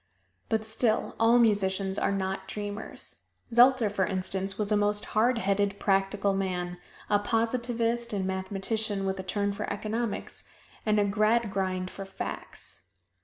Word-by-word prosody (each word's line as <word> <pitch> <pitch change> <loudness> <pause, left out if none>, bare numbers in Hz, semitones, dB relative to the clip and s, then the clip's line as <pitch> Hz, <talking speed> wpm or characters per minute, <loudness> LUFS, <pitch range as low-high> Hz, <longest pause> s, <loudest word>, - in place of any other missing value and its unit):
But 220 -1 0
still, 220 0 +1
all 230 +2 +6
musicians 195 -4 +2
are - - +1
not 190 -1 -2
dreamers. 205 +1 -6 0.3
Zelter, 245 -1 +6
for 195 -2 +1
instance, 190 +1 -1
was 210 -1 -1
a - - +5
most 205 0 +2
hard 235 +3 +3
headed, 200 0 0
practical 195 0 +1
man: 180 -2 -2 0.3
a 205 -1 +3
positivist 235 +2 0
and 195 -3 -1
mathematician 195 +2 -2
with 190 0 -1
a - - -3
turn 200 +2 -1
for 210 +1 -4
economics, 215 +2 -3 0.4
and 210 0 +4
a 205 - +3
Gradgrind 200 -3 +1
for 195 - -7
facts. 195 - -6
205 Hz, 140 wpm, -28 LUFS, 195-220 Hz, 0.4 s, all